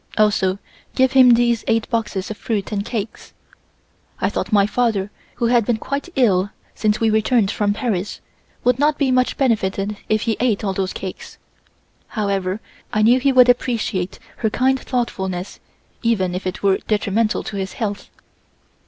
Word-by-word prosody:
Also 205 -3 +2 0.4
give 260 0 +3
him 255 -3 +7
these 235 -1 +2
eight 225 0 +1
boxes 215 -4 -2
of 215 - -6
fruit 215 -3 -3
and 200 -1 -1
cakes." 220 -1 -5 0.9
I - - +1
thought - - -3
my 200 -2 +5
father, 210 -3 0 0.2
who 240 - -1
had 235 0 +4
been 225 +1 0
quite 280 +8 -4
ill 205 -7 +3 0.2
since 210 -1 0
we 225 -1 +2
returned 220 -1 +2
from 205 -1 0
Paris, 205 -4 -2 0.4
would 250 0 +2
not 295 +1 +2
be 275 -3 +1
much 255 0 +1
benefited 210 -5 0
if 215 -1 +1
he 225 -2 0
ate 235 -4 +1
all 195 -2 0
those 190 -1 -2
cakes. 190 -1 -7 0.7
However, 200 -2 -2 0.3
I 215 - +1
knew 240 +4 +5
he 275 +1 +2
would 255 -1 +6
appreciate 230 -6 0 0.2
her 220 - 0
kind 260 +4 +1
thoughtfulness 190 -8 -3 0.4
even 195 -7 +1
if 185 +1 -3
it 185 - -5
were 195 -1 +4
detrimental 215 +1 +1
to 205 - -6
his 190 0 -4
health. 205 -3 -4
215 Hz, 165 wpm, -20 LUFS, 200-245 Hz, 0.9 s, him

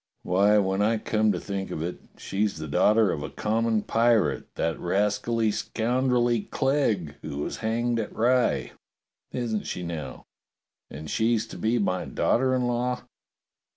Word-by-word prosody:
Why, 100 +4 +4
when 95 -1 +1
I 110 +2 +2
come 110 0 +1
to 90 - -2
think 100 0 -4
of 80 - -4
it, 90 +1 -4 0.2
she's 100 -1 -1
the 80 0 -5
daughter 105 +7 +4
of 70 - -3
a - - -5
common 110 0 0
pirate, 115 -1 +2
that 80 - -1
rascally, 105 +4 +1
scoundrelly 120 0 0
Clegg, 115 - 0
who 75 -2 -6
was 75 - -3
hanged 115 +1 0
at 110 - -3
Rye. 125 +2 +1 0.6
Isn't 115 -4 -2
she 90 - -4
now.^ 80 -7 -6 0.7
And 75 +2 -8
she's 110 +4 +1
to - - -8
be 115 +2 +1
my 95 -4 0
daughter 130 +1 +1
in 125 -1 0
law! 125 +1 -1
110 Hz, 155 wpm, -26 LUFS, 95-120 Hz, 0.7 s, Why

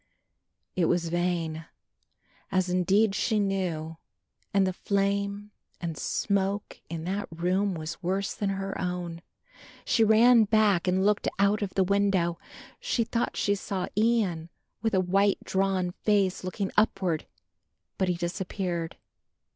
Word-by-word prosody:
It 180 - +2
was 170 0 +1
vain, 165 -2 -1 0.8
as 185 -1 +1
indeed 195 +4 +3
she 215 +1 +1
knew, 175 -5 -2 0.5
and 195 -1 +3
the 185 - -1
flame 200 +1 -1 0.3
and 170 -2 -4
smoke 200 +4 -1
in 165 -1 -5
that 195 +4 -2
room 180 +4 0
was 160 +2 -6
worse 190 +2 -1
than 205 - -2
her 195 0 -3
own. 180 -2 -3 0.6
She 225 - +3
ran 225 +1 +6
back 205 -4 +3
and 185 +1 +2
looked 210 0 +2
out 200 +2 +3
of 200 -2 -3
the 190 - +4
window. 190 -3 +1 0.4
She 485 - 0
thought 230 +1 -2
she 205 - +2
saw 195 -2 -3
Ian 210 -7 +1 0.3
with 225 -2 +1
a - - +4
white 195 +2 +2
drawn 190 -2 0
face 195 -1 +1
looking 190 +2 -3
upward, 190 -6 +1 0.7
but 190 - +2
he 180 - +1
disappeared. 175 -1 -3
190 Hz, 135 wpm, -28 LUFS, 175-205 Hz, 0.8 s, ran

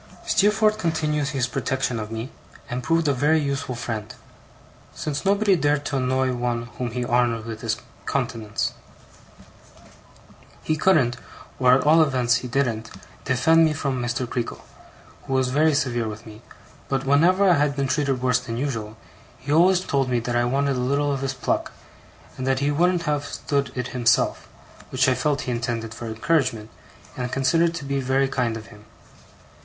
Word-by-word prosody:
Steerforth 215 +1 +3
continued 155 -5 0
his 135 -2 0
protection 125 -1 -2
of 105 -1 -5
me, 115 +3 -5 0.4
and 125 +1 -2
proved 165 +4 +1
a 145 - +3
very 150 +5 +3
useful 140 -3 -2
friend; 115 -3 -5 0.8
since 145 -1 -3
nobody 200 0 +3
dared 145 -2 +1
to 145 - -1
annoy 130 0 +1
one 120 -1 -2 0.2
whom 125 -1 -1
he 120 +1 -3
honoured 120 -2 +1
with 110 -1 -7
his - - -1 0.3
countenance. 110 -2 -2 1.9
He 155 - 0
couldn't 150 -8 +3 0.4
or 125 -1 +5
at 130 - +1
all 160 +2 +6
events 125 -5 +2
he 125 - -6
didn't 120 -4 -1 0.4
defend 160 +6 +4
me 155 -1 +3
from 140 -4 -2
Mr. 120 +1 -2
Creakle, 120 0 -4 0.7
who 135 - -2
was 130 -1 +2
very 150 +3 +3
severe 120 -5 0
with 110 0 -7
me; 110 0 -12 0.5
but 135 -1 -1
whenever 175 +8 +4
I 180 - +6
had 145 -1 +1
been 140 -1 0
treated 135 -2 0
worse 125 -1 +3
than 120 -2 -6
usual, 115 -5 -3 0.4
he 135 +3 -6
always 180 +4 +5
told 135 -7 0
me 125 -1 +1
that 120 +1 -3
I 120 0 +2
wanted 135 +2 0
a - - -1
little 140 +3 +1
of 135 - -3
his 135 0 -2
pluck, 125 - -2 0.7
and 130 - -3
that 135 0 +2
he 140 +2 +1
wouldn't 175 +3 +2
have 150 -2 0
stood 140 -1 -2
it 125 -1 -3
himself; 125 -1 +1 0.4
which - - +2
I 130 - +4
felt 145 +2 0
he 125 - -3
intended 120 -2 -3
for 115 0 -7
encouragement, 115 -2 0 0.4
and 125 0 -4
considered 165 +6 +2
to 160 -4 -6
be 140 0 -1
very 135 +1 +1
kind 125 -4 -1
of 110 - -10
him. 105 0 -16
130 Hz, 175 wpm, -23 LUFS, 120-150 Hz, 1.9 s, all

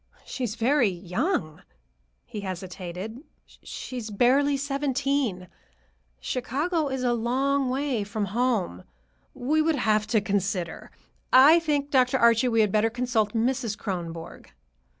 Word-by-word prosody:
"She 260 - -5
is 220 -3 -2
very 245 0 +3
young," 180 - -2 0.6
he 215 - -7
hesitated; 185 +3 -6 0.3
"she 255 - -9
is 225 -2 -5
barely 270 +7 +3
seventeen. 275 -7 -1 0.7
Chicago 290 - -1
is 265 -1 -3
a 245 -1 +2
long 260 +3 0
way 260 -4 -1
from 205 +1 -3
home. 225 - 0 0.5
We 300 +6 +1
would 320 0 +2
have 215 -5 +1
to 220 0 +2
consider. 195 -3 -2 0.4
I 290 +6 +8
think, 290 -3 -1
Dr. 255 -1 +3
Archie, 235 0 +4
we 225 -2 +3
had 210 -2 +2
better 215 +2 +2
consult 235 -3 -1
Mrs. 235 -1 -1
Kronborg." 170 -4 -6
240 Hz, 130 wpm, -26 LUFS, 205-275 Hz, 0.7 s, I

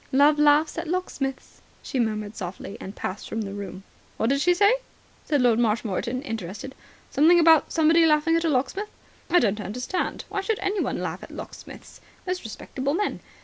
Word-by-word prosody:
"Love 290 +3 +5
laughs 300 +2 +4
at 335 - -5
locksmiths," 290 -6 -4 0.2
she 265 - -3
murmured 215 -2 -1
softly, 190 +1 -6
and 195 +2 -7
passed 185 - -5
from 225 - -2
the 200 -2 -5
room. 200 -1 -7 0.3
"What 225 - +1
did 275 0 +1
she 355 +2 +4
say?" 405 +5 +5 0.5
asked 295 -2 0
Lord 240 -2 +4
Marshmoreton, 230 +2 0
interested. 225 - -6 0.4
"Something 335 +5 +5
about 320 -2 +5
somebody 325 +1 +4
laughing 310 +2 +3
at 330 - +1
a 330 - +2
locksmith? 305 +10 -1 0.4
I 355 - +4
don't 210 - +2
understand. 250 - -3
Why 400 0 -2
should 435 +2 -1
anyone 395 0 -1
laugh - - -4
at - - -10
locksmiths? - - -10 0.2
Most 365 0 -3
respectable 265 +5 -3
men. 410 +3 -1
280 Hz, 175 wpm, -25 LUFS, 225-335 Hz, 0.5 s, Love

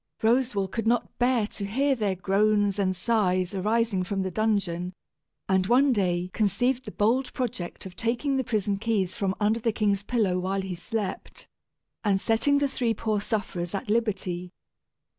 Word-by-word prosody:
Roswal 230 -4 +2
could 225 +3 -3
not 240 0 0
bear 245 -3 +3
to 205 - -7
hear 270 +8 +1
their 210 -6 0
groans 205 +2 +2
and 185 -1 +1
sighs 185 -3 +1
arising 210 +1 +1
from 195 +1 -2
the 190 - -3
dungeon, 190 -4 0 0.5
and 190 -1 +2
one 260 +4 +4
day 180 -3 0
conceived 245 +5 +1
the 210 - -6
bold 240 +7 +1
project 235 -10 -4
of 185 -1 -9
taking 240 +6 0
the 265 - +1
prison 210 -4 0
keys 200 -4 0
from 195 -1 -1
under 215 +2 +2
the 230 0 +1
king's 205 -2 +1
pillow 205 -5 0
while 190 +2 -1
he 190 -1 -4
slept, 195 +2 -5 0.6
and 200 -3 +2
setting 230 +8 +3
the 285 0 +2
three 240 -4 -1
poor 215 -1 -1
sufferers 200 -5 -3
at 205 +3 -4
liberty. 190 -5 -1
210 Hz, 165 wpm, -26 LUFS, 190-230 Hz, 0.6 s, one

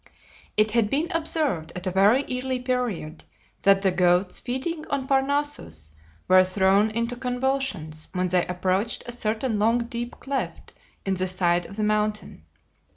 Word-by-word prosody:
It 215 0 +3
had 225 -2 +2
been 305 +8 0
observed 310 - -1
at 180 +1 -5
a 185 - 0
very 205 +8 +4
early 255 0 -1
period 245 -11 -2 0.4
that 195 0 +4
the 190 - +3
goats 180 +1 +2
feeding 280 +6 -3
on 275 -2 -2
Parnassus 270 - -1 0.4
were 185 0 +7
thrown 190 +3 +3
into 230 +2 -2
convulsions 250 - -2
when 180 0 -1
they 180 0 +3
approached 185 +5 -1
a 240 - -5
certain 225 -1 -1
long 230 +3 +2
deep 240 0 -6
cleft 275 0 -4 0.3
in 195 - +1
the 185 0 -1
side 175 -1 +1
of 200 - -11
the 215 - -2
mountain. 210 - -1
215 Hz, 155 wpm, -25 LUFS, 185-255 Hz, 0.4 s, were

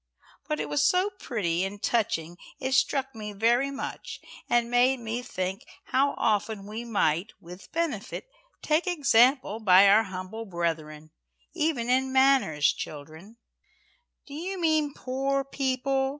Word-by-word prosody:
"But 150 - -2
it 150 - -2
was 145 0 +1
so 370 +3 +2
pretty 180 -8 -1
and 200 +1 -5
touching, 175 -7 -1 0.2
it 260 0 -3
struck 270 +1 +1
me 210 -2 -7
very 235 +6 +2
much, 275 +1 -6 0.3
and 240 0 +2
made 250 +2 +3
me 230 +1 -4
think 190 -1 -4 0.2
how 275 +2 +1
often 210 -1 0
we 215 +3 -6
might, 200 -4 0
with 180 +3 -13
benefit, 325 - -3 0.4
take 315 +4 +1
example 265 - +3
by 195 -2 +6
our 205 +3 +6
humble 190 +4 -7
brethren 160 -4 -4 0.4
even 305 -8 -1
in 260 +1 +1
manners, 265 - +3
children." 160 +9 -9 0.9
"Do 280 - -12
you 365 +5 -5
mean 310 -4 +1
poor 270 +2 -1
people?" 270 0 -1
235 Hz, 135 wpm, -27 LUFS, 190-270 Hz, 0.9 s, by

